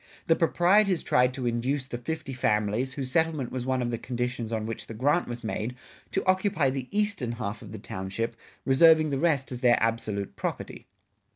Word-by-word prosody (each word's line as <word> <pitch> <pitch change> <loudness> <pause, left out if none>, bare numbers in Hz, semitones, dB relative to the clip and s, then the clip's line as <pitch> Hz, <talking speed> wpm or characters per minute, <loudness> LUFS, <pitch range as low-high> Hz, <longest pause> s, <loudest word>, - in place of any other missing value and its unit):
The 165 - +4
proprietors 180 +3 +3
tried 125 0 +3
to 130 -2 -4
induce 125 +4 0
the 120 -2 -6
fifty 155 +2 -4
families, 110 +1 0
whose 130 -2 -4
settlement 160 -6 +1
was 130 -1 -4
one 130 -1 +1
of 120 - -2
the 115 - -3
conditions 120 -2 -3
on 110 -1 -1
which 115 -1 -6
the 115 - -7
grant 145 +9 +2
was 120 0 -6
made, 110 +2 -3 0.4
to 195 - -1
occupy 185 -6 +2
the 130 -1 -4
eastern 200 - -1
half 110 -2 -4
of 105 -4 -10
the 110 - -6
township 105 +2 -4 0.3
reserving 155 +3 +6
the 135 - 0
rest 145 -5 +1
as 125 -1 -5
their 120 -1 +5
absolute 110 -3 -1
property. - - -5
125 Hz, 190 wpm, -27 LUFS, 115-155 Hz, 0.4 s, reserving